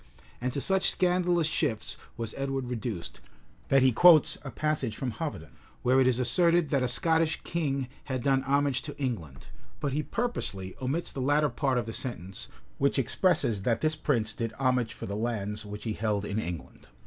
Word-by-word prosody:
And 125 +1 -1
to 140 - -1
such 190 +4 +3
scandalous 180 -2 +2
shifts 145 -7 -1 0.2
was 115 -2 -4
Edward 135 -2 -2
reduced, 110 -7 -4 0.5
that 135 -1 +4
he 130 - +5
quotes 160 +4 +6
a 135 - -7
passage 140 -6 -1
from 130 -2 -2
Hoveden[] 140 - -5 0.3
where 130 +2 +4
it 130 - +4
is 125 -2 +3
asserted 170 +6 +3
that 140 -2 +2
a 125 - +1
Scottish 160 +5 +2
king 140 -6 -1 0.2
had 130 -3 -3
done 135 -1 +3
homage 140 -1 +1
to 145 +1 -8
England; 95 - -4 0.3
but 140 -3 -2
he 150 - +1
purposely 105 - -3
omits 140 +7 -1
the 135 - -4
latter 145 +3 +3
part 135 -3 0
of 120 - 0
the 115 - -6
sentence, 95 -8 -4 0.3
which 140 +1 +2
expresses 135 - +1
that 115 +3 0
this 155 0 +1
prince 115 -9 0
did 115 -1 -3
homage 125 -3 +1
for - - -7
the 100 - -4
lands 105 -2 -3
which 105 +1 -7
he 110 - -2
held 105 -2 -1
in 105 +1 -2
England. 85 -10 -6
130 Hz, 185 wpm, -29 LUFS, 115-150 Hz, 0.5 s, quotes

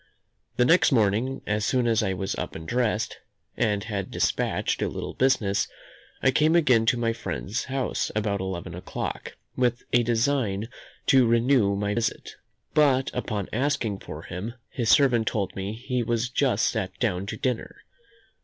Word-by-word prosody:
The 125 - +4
next 170 +4 +5
morning, 115 +3 +1
as 105 0 0
soon 125 +2 +1
as 115 -1 +3
I 95 -3 0
was 95 +1 -3
up - - -5
and 80 0 -8
dressed, 115 -1 0 0.4
and 105 -3 0
had 105 -4 -4
despatched - - 0
a - - +1
little - - -5
business, 110 -7 +2 0.6
I 130 - +5
came 155 +5 +3
again 125 -9 +4
to 125 - +3
my 115 -1 0
friend's 115 -1 -4
house 135 -1 -1
about 105 -2 0
eleven 95 -2 -4
o'clock, 90 - -5 0.2
with 120 -1 +1
a 120 - +6
design 115 -3 0 0.4
to 130 -3 +5
renew 115 -3 +3
my 100 +1 -1
visit: 115 0 -2 0.4
but, 135 -4 +3
upon 105 -5 -3
asking 125 -5 0
for - - -8
him, 105 +7 -6 0.2
his 120 -5 -1
servant 120 -6 +4
told 100 -3 -1
me 95 +2 -3
he 125 +2 -2
was 120 +1 0
just 125 -4 +2
sat 100 -4 -3
down 100 -5 -1
to - - -4
dinner. 125 -4 -3
115 Hz, 165 wpm, -26 LUFS, 100-125 Hz, 0.6 s, a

